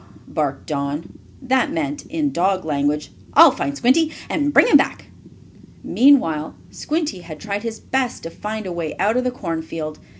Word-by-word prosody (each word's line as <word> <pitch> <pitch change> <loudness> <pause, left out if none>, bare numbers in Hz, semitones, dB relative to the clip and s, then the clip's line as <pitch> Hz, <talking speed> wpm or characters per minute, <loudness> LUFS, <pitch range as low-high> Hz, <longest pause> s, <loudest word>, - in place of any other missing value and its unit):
barked 145 -3 -2
Don. 145 +1 -4 0.2
That 265 +3 +1
meant, 295 -2 -3
in 305 -3 -1
dog 185 -1 0
language, 145 0 -1 0.2
"I'll 320 0 +9
find 280 +2 -3
Squinty 295 +6 +3 0.2
and 290 -3 +1
bring - - +6
him - - +4
back." - - +2 0.7
Meanwhile 165 - +3 0.2
Squinty 305 - -2
had 160 -3 -10
tried 205 -1 -3
his 225 -1 -5
best 260 -2 -2
to 165 - -6
find 215 +2 -5
a 185 - -4
way 170 -3 -4
out 215 +3 +1
of 250 - +1
the 255 - +1
cornfield. 160 -8 -5
215 Hz, 165 wpm, -21 LUFS, -, 0.7 s, I'll